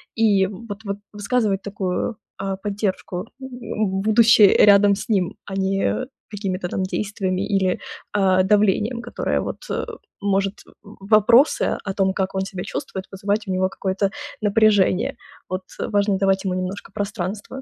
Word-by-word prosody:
и 210 Hz, -4 st, +4 dB
вот 205 Hz, +1 st, -8 dB
вот 200 Hz, 0 st, -3 dB, 0.2 s
высказывать 205 Hz, -2 st, 0 dB
такую, 195 Hz, +2 st, -2 dB, 0.3 s
а, 195 Hz, 0 st, -2 dB
поддержку, 200 Hz, -2 st, -3 dB, 0.2 s
м, 265 Hz, -, -6 dB, 0.5 s
будучи 220 Hz, +1 st, +6 dB, 0.2 s
рядом 200 Hz, 0 st, +7 dB
с 200 Hz, -, -7 dB
ним, 190 Hz, -5 st, +1 dB
а 195 Hz, -, -6 dB
не 195 Hz, +6 st, 0 dB, 0.3 s
какими-то 195 Hz, -3 st, -3 dB
там 190 Hz, -, -2 dB
действиями 190 Hz, -1 st, -2 dB
или, 190 Hz, -3 st, +1 dB, 0.3 s
а, 190 Hz, -2 st, +3 dB
давлением, 210 Hz, +4 st, +2 dB
которое -, -, -2 dB
вот, -, -, -5 dB
э, -, -, -1 dB, 0.4 s
может, 195 Hz, -1 st, +1 dB, 0.3 s
в 200 Hz, -1 st, -14 dB
вопросы 235 Hz, +7 st, +5 dB
о 195 Hz, -, -2 dB
том, 190 Hz, -1 st, +1 dB
как 190 Hz, 0 st, -2 dB
он 190 Hz, -, +1 dB
себя 190 Hz, -2 st, -5 dB
чувствует, 190 Hz, 0 st, -5 dB
вызывать 200 Hz, +2 st, -1 dB
у -, -, -2 dB
него 185 Hz, 0 st, +1 dB
какое-то 195 Hz, +1 st, -1 dB, 0.3 s
напряжение. 205 Hz, -3 st, +3 dB, 0.3 s
Вот, 185 Hz, 0 st, -2 dB, 0.2 s
э, -, -, -2 dB
важно 200 Hz, -1 st, +2 dB
давать 195 Hz, 0 st, +1 dB
ему 185 Hz, -, 0 dB
немножко 185 Hz, +2 st, -4 dB
пространства. 205 Hz, +4 st, -4 dB
200 Hz, 150 wpm, -22 LUFS, 190-210 Hz, 0.5 s, рядом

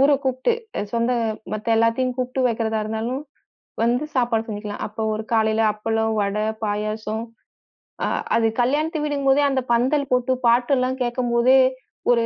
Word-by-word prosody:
ஊரக் 280 Hz, 0 st, +4 dB
கூப்பிட்டு 260 Hz, -, +1 dB, 0.3 s
அ -, -, -1 dB
சொந்த 235 Hz, +1 st, +1 dB, 0.4 s
மத்த 215 Hz, +2 st, 0 dB
எல்லாத்தையும் 230 Hz, +3 st, +2 dB
கூப்ட்டு 255 Hz, +1 st, -2 dB
வைக்கறதா 225 Hz, -1 st, -1 dB
இருந்தாலும், 225 Hz, +5 st, -3 dB, 0.6 s
வந்து 245 Hz, +5 st, +1 dB
சாப்பாடு 235 Hz, -3 st, +1 dB
செஞ்சுக்கலாம். 210 Hz, -1 st, -5 dB
அப்ப 220 Hz, +1 st, -4 dB
ஒரு 215 Hz, +1 st, -3 dB
காலைல 220 Hz, 0 st, +2 dB
அப்பளம், 220 Hz, +1 st, -1 dB
வடை, 205 Hz, +2 st, -1 dB, 0.2 s
பாயாசம். 215 Hz, +1 st, -2 dB, 0.8 s
அ -, -, 0 dB, 0.3 s
அது 225 Hz, -1 st, +3 dB
கல்யாண்த்து 300 Hz, +5 st, 0 dB
வீடுங்கம்போதே, 285 Hz, -1 st, +2 dB
அந்தப் 260 Hz, -2 st, -2 dB
பந்தல் 265 Hz, +4 st, +1 dB
போட்டுப் 250 Hz, +1 st, 0 dB
பாட்டு 240 Hz, +3 st, +3 dB
எல்லாம் 255 Hz, +1 st, -1 dB
கேட்கும்போதே, 240 Hz, +1 st, +3 dB, 0.5 s
ஒரு 235 Hz, -1 st, +3 dB
235 Hz, 140 wpm, -22 LUFS, 220-260 Hz, 0.8 s, ஊரக்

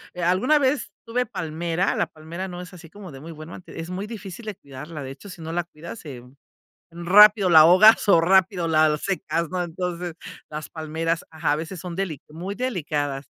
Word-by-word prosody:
alguna 185 Hz, -, +2 dB
vez 265 Hz, -6 st, 0 dB
tuve 245 Hz, +2 st, -1 dB
palmera, 170 Hz, -3 st, -2 dB
la -, -, +1 dB
palmera 165 Hz, +4 st, -7 dB
no 180 Hz, -1 st, -7 dB
es 180 Hz, +1 st, -11 dB
así 165 Hz, -2 st, -13 dB
como 200 Hz, -3 st, -11 dB
de 135 Hz, -, -10 dB
muy 165 Hz, +3 st, -9 dB
buena, 155 Hz, +4 st, -10 dB
es 165 Hz, +1 st, -8 dB
muy 195 Hz, +3 st, -4 dB
difícil 215 Hz, 0 st, -9 dB
de 210 Hz, -3 st, -5 dB
cuidarla, 145 Hz, +1 st, -9 dB
de 130 Hz, -, -7 dB
hecho, 135 Hz, +9 st, -12 dB
si 170 Hz, -2 st, -10 dB
no 160 Hz, 0 st, -6 dB
la 175 Hz, 0 st, -1 dB
cuidas, 170 Hz, +6 st, -10 dB
se 130 Hz, -6 st, -9 dB, 0.7 s
rápido 195 Hz, +3 st, +6 dB
la 160 Hz, -2 st, +9 dB
ahogas 185 Hz, +7 st, +7 dB
o 170 Hz, -4 st, +6 dB
rápido 185 Hz, -1 st, +3 dB
la 155 Hz, -1 st, +3 dB
secas, 170 Hz, -4 st, -2 dB
¿no? 180 Hz, -1 st, -2 dB
Entonces, 175 Hz, 0 st, -4 dB, 0.4 s
las 155 Hz, 0 st, -7 dB
palmeras, 160 Hz, +1 st, -3 dB
ajá, 160 Hz, -2 st, 0 dB
a -, -, +1 dB
veces 165 Hz, +3 st, -6 dB
son 175 Hz, 0 st, -7 dB
deli 180 Hz, -8 st, -3 dB
muy 175 Hz, +6 st, -6 dB
delicadas. 150 Hz, -, -3 dB
170 Hz, 195 wpm, -24 LUFS, 160-190 Hz, 0.7 s, la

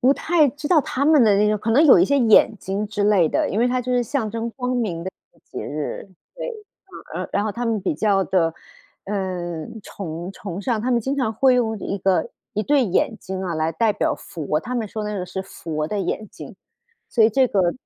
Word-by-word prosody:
不 260 Hz, +2 st, +4 dB
太 315 Hz, -2 st, +3 dB
知 295 Hz, +3 st, -6 dB
道 315 Hz, 0 st, +5 dB
他 270 Hz, 0 st, -2 dB
们 300 Hz, -2 st, +5 dB
的 210 Hz, -3 st, +5 dB
那 210 Hz, +1 st, +3 dB
种 210 Hz, 0 st, +1 dB
可 220 Hz, +3 st, -2 dB
能 275 Hz, +8 st, +5 dB
有 275 Hz, -, +8 dB
一 175 Hz, -, +5 dB
些 280 Hz, -, +2 dB
眼 225 Hz, -2 st, +5 dB
睛 195 Hz, +3 st, -3 dB
之 205 Hz, -1 st, -2 dB
类 200 Hz, -6 st, +4 dB
的， -, -, 0 dB
因 205 Hz, -, -1 dB
为 240 Hz, +2 st, +3 dB
它 250 Hz, 0 st, 0 dB
就 250 Hz, +1 st, -2 dB
是 245 Hz, 0 st, +2 dB
象 235 Hz, -2 st, -2 dB
征 230 Hz, +1 st, -3 dB
光 250 Hz, +1 st, -3 dB
明 190 Hz, -9 st, -2 dB
的 190 Hz, -, -3 dB, 0.2 s
一 -, -, -44 dB
个 -, -, -28 dB
节 -, -, -7 dB
日， 150 Hz, +6 st, -5 dB, 0.3 s
对， -, -, -5 dB
嗯。 445 Hz, -3 st, -8 dB, 0.5 s
然 -, -, -4 dB
然 200 Hz, -, +1 dB
后 215 Hz, -, -2 dB
他 240 Hz, +2 st, -3 dB
们 225 Hz, -2 st, 0 dB
比 185 Hz, -, 0 dB
较 195 Hz, +3 st, +2 dB
地， 165 Hz, -4 st, +1 dB, 0.5 s
呃， 180 Hz, -5 st, -3 dB, 0.2 s
崇 175 Hz, -1 st, -7 dB
崇 195 Hz, -2 st, -6 dB
尚 230 Hz, -1 st, 0 dB
他 245 Hz, +4 st, -1 dB
们 240 Hz, -, +3 dB
经 265 Hz, +5 st, -2 dB
常 260 Hz, -5 st, 0 dB
会 260 Hz, +3 st, +4 dB
用 225 Hz, -3 st, 0 dB
一 200 Hz, -, -4 dB
个 190 Hz, +4 st, +1 dB, 0.2 s
一 215 Hz, -, 0 dB
对 285 Hz, +3 st, +3 dB
眼 215 Hz, +3 st, 0 dB
睛 190 Hz, 0 st, -5 dB
啊， 180 Hz, -3 st, -3 dB
来 160 Hz, 0 st, 0 dB
代 215 Hz, +6 st, +2 dB
表 205 Hz, -, 0 dB
佛， 155 Hz, -2 st, -3 dB
他 240 Hz, +10 st, -5 dB
们 230 Hz, -4 st, -2 dB
说 215 Hz, +1 st, -5 dB
那 210 Hz, 0 st, -3 dB
个 180 Hz, -, -4 dB
是 190 Hz, +1 st, -5 dB
佛 160 Hz, -5 st, -5 dB
的 205 Hz, +5 st, -2 dB
眼 195 Hz, +3 st, -3 dB
睛， -, -, -11 dB, 0.5 s
所 230 Hz, -, +3 dB
以 220 Hz, -, +6 dB
这 260 Hz, +4 st, +3 dB
个 185 Hz, -6 st, +2 dB
210 Hz, 260 characters per minute, -22 LUFS, 190-245 Hz, 0.5 s, 有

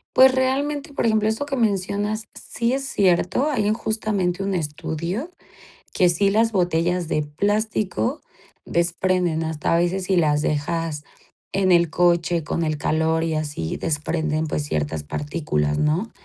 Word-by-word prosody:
Pues, 260 Hz, 0 st, +8 dB
realmente, 280 Hz, +3 st, -1 dB
por 240 Hz, -, 0 dB
ejemplo, 220 Hz, -1 st, +2 dB
eso 220 Hz, +6 st, -1 dB
que 275 Hz, -1 st, -3 dB
mencionas 205 Hz, 0 st, -1 dB
sí 235 Hz, +1 st, -2 dB
es 270 Hz, +1 st, -1 dB
cierto, 195 Hz, -, +2 dB
hay 215 Hz, -8 st, 0 dB
justamente 200 Hz, -5 st, -1 dB
un 195 Hz, -1 st, -1 dB
estudio 165 Hz, -, -3 dB, 0.6 s
que 180 Hz, -, +4 dB
sí 185 Hz, +3 st, +3 dB
las 225 Hz, +2 st, +2 dB
botellas 175 Hz, -1 st, +1 dB
de 150 Hz, -, +1 dB
plástico 200 Hz, -, -1 dB, 0.4 s
desprenden. 170 Hz, -1 st, +1 dB
Hasta 160 Hz, 0 st, -1 dB
a -, -, +4 dB
veces 180 Hz, +2 st, 0 dB
si 190 Hz, -, +1 dB
las 150 Hz, -3 st, +2 dB
dejas 155 Hz, 0 st, -2 dB, 0.5 s
en 190 Hz, -2 st, +3 dB
el 170 Hz, -2 st, +4 dB
coche 170 Hz, -1 st, +2 dB
con 170 Hz, -, -1 dB
el 155 Hz, -1 st, -1 dB
calor 160 Hz, +2 st, +1 dB
y 160 Hz, -, -1 dB
así 145 Hz, -, -3 dB
desprenden, 155 Hz, 0 st, -1 dB
pues, 150 Hz, -, -2 dB
ciertas 75 Hz, -, -2 dB
partículas, 75 Hz, -, -2 dB
¿no? 165 Hz, +9 st, 0 dB
175 Hz, 150 wpm, -22 LUFS, 155-210 Hz, 0.6 s, Pues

